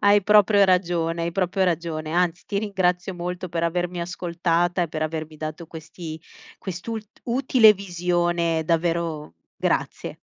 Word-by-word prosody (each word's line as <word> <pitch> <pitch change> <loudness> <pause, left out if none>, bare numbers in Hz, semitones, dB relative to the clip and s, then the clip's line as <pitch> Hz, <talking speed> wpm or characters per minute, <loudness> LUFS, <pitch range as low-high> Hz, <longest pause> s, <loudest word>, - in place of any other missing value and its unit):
Hai 205 0 +6
proprio 205 0 +5
ragione, 175 -3 +1
hai 170 0 -2
proprio 190 0 +1
ragione, 165 -3 -2
anzi 175 0 0
ti 200 - -2
ringrazio 190 -3 0
molto 180 +1 -4
per 165 0 -3
avermi 175 +1 -1
ascoltata 175 0 0
e 170 - -2
per 155 - -5
avermi 155 0 -4
dato 155 +2 -6
questi 160 0 -8 0.4
quest'ul 195 +5 -5 0.2
utile 240 -2 +5
visione, 175 -3 0
davvero 165 - -1 0.2
grazie. - - -1
175 Hz, 135 wpm, -24 LUFS, 165-185 Hz, 0.4 s, Hai